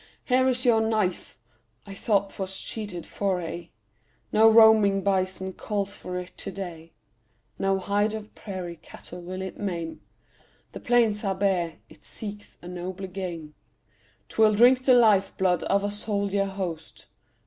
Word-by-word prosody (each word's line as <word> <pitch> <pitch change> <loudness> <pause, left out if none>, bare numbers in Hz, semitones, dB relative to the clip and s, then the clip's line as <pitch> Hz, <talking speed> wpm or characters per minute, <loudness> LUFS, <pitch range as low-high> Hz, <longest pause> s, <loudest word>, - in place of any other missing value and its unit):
Here 260 0 +3
is 255 0 0
your 230 -2 +5
knife! 215 -5 -1 0.5
I 200 - -9
thought 200 -1 0
'twas 190 -1 -2
sheathed 200 -4 -5
for 195 -3 -1
aye. 170 0 -6 0.6
No 220 +1 +6
roaming 220 -3 +6
bison 190 -1 0
calls 200 -1 -3
for 180 0 -6
it 180 0 -7
to - - -5
day; 170 -4 -8 0.7
No 195 0 +2
hide 205 +3 0
of 215 -1 -8
prairie 180 -4 -7
cattle 175 +2 -11
will 185 +2 -6
it 190 - -7
maim; 170 -5 -4 0.7
The - - -8
plains 230 -3 +2
are 195 -2 0
bare, 185 -4 0
it - - -19
seeks 205 -1 -7
a - - -9
nobler 180 +2 -6
game: 175 -5 -6 0.7
'Twill 215 -1 +3
drink 250 +4 +5
the 255 - +6
life 210 -5 +4
blood 180 -2 +2
of 200 0 +2
a 205 - -1
soldier 200 -1 0
host. 185 -5 -6
195 Hz, 150 wpm, -26 LUFS, 180-215 Hz, 0.7 s, No